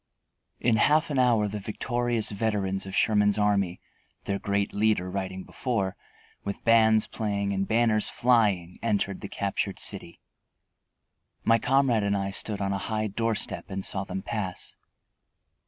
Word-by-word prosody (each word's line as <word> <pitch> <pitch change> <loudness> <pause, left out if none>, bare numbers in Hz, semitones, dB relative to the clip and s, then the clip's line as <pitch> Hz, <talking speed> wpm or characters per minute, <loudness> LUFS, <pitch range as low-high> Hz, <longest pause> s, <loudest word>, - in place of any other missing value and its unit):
In 115 -2 +2
half 155 +6 +3
an 140 - +1
hour 115 -4 +3
the 105 +1 -4
victorious 120 +2 -1
veterans 100 -2 -1
of 95 - -6
Sherman's 105 -2 +3
army, 100 -4 +1 0.4
their 100 0 -2
great 100 0 -1
leader 105 -3 +1
riding 95 -1 -4
before, 105 -7 -2 0.5
with 100 0 -5
bands 110 -1 +5
playing 100 -2 -2
and 95 0 -1
banners 110 -1 +2
flying, 105 -8 +2
entered 100 -4 -1
the 100 - -6
captured 100 0 -2
city. 85 - -4 1.2
My 115 0 +4
comrade 130 -2 +2
and 100 0 +1
I 95 0 -2
stood 100 +1 -1
on 100 0 0
a 100 - -2
high 110 +2 -2
door 115 +2 0
step - - -2
and 95 -1 -4
saw 95 -1 -1
them 95 0 -5
pass. 100 -5 -4
105 Hz, 150 wpm, -27 LUFS, 95-115 Hz, 1.2 s, bands